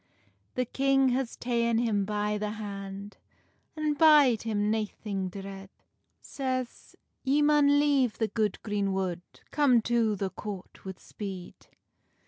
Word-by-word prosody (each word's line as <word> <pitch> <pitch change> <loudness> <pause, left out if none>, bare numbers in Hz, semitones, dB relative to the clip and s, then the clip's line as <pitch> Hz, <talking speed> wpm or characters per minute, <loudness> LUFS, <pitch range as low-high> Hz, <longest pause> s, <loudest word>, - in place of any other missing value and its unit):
The 255 - 0
king 270 +1 +2
has 255 -1 -2
taen 235 -1 0
him 215 -4 +1
by 210 0 -1
the 210 0 -3
hand, 200 -1 -7 0.6
An 305 -1 0
bide 290 -6 +6
him 210 -2 0
naithing 210 -3 -3
dread; 195 0 -8 0.5
Says, 255 -2 -4 0.3
"Ye 280 +2 +2
maun 290 -1 +5
leave 280 -6 +2
the 220 - +1
good 215 -3 -1
greenwood, 195 -4 -1 0.3
Come 280 -5 +4
to 230 -3 +1
the 195 -1 -3
court 200 -3 -8
wi 190 -1 -6
speed." 190 -4 -9
220 Hz, 125 wpm, -28 LUFS, 200-260 Hz, 0.6 s, bide